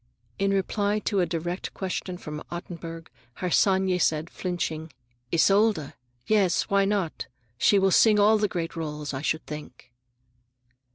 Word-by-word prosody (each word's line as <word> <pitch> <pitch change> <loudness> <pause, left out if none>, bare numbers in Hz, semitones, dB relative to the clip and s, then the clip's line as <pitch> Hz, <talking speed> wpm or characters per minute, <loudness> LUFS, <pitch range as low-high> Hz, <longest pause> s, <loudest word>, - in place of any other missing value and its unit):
In 195 0 +2
reply 200 +1 0
to 205 -1 -1
a 175 - +2
direct 175 +2 -4
question 185 -1 -4
from 150 -3 -7
Ottenburg, 165 -1 -7 0.3
Harsanyi 190 0 +2
said, 160 0 0
flinching, 165 -3 -3 0.4
"Isolde? 195 -2 +3 0.3
Yes, 200 -5 +3
why 200 0 +2
not? 195 -5 -1 0.3
She 205 - +5
will 195 0 +3
sing 215 +2 +5
all 215 +1 +5
the 210 - +2
great 170 -3 -4
roles, 150 -3 -4
I 135 - -3
should 155 +1 -1
think." 145 -5 -9
180 Hz, 135 wpm, -26 LUFS, 160-200 Hz, 0.4 s, She